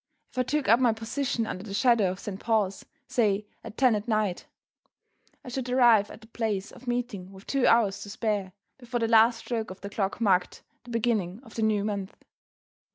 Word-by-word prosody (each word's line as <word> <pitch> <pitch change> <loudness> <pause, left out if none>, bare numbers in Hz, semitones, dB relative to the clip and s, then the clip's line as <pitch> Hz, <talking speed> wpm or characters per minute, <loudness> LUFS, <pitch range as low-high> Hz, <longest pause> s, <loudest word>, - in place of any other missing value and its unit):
If - - -5
I - - +5
took 280 +2 -1
up 230 +4 +6
my 245 -3 +4
position 235 +2 -2
"under 185 -3 -5
the 200 -2 -6
shadow 235 -4 +4
of 185 +1 -5
Saint 200 -2 -6
Paul's," 210 -4 0 0.2
say, 210 -3 +1 0.2
at 210 - -10
ten 255 -3 +4
that 210 +1 -2
night, 215 -5 0 1.0
I - - -7
should 250 0 -4
arrive 235 -5 +5
at - - -11
the 220 - -15
place 220 -4 -2
of 250 0 -15
meeting 240 -6 -3
with 195 +1 -14
two 275 -2 +1
hours 215 -4 +3
to 205 - -8
spare, 205 -3 -2 0.3
before 245 -1 -3
the 230 - +1
last 230 +1 +5
stroke 225 -1 -3
of 185 +1 -10
the 200 - -7
clock 195 +1 -2
marked 190 -5 +1 0.2
the - - -12
beginning 220 -5 0
of 225 - -15
the 225 - -3
new 215 -2 +2
month. 200 -2 -3
220 Hz, 205 wpm, -27 LUFS, 200-240 Hz, 1.0 s, up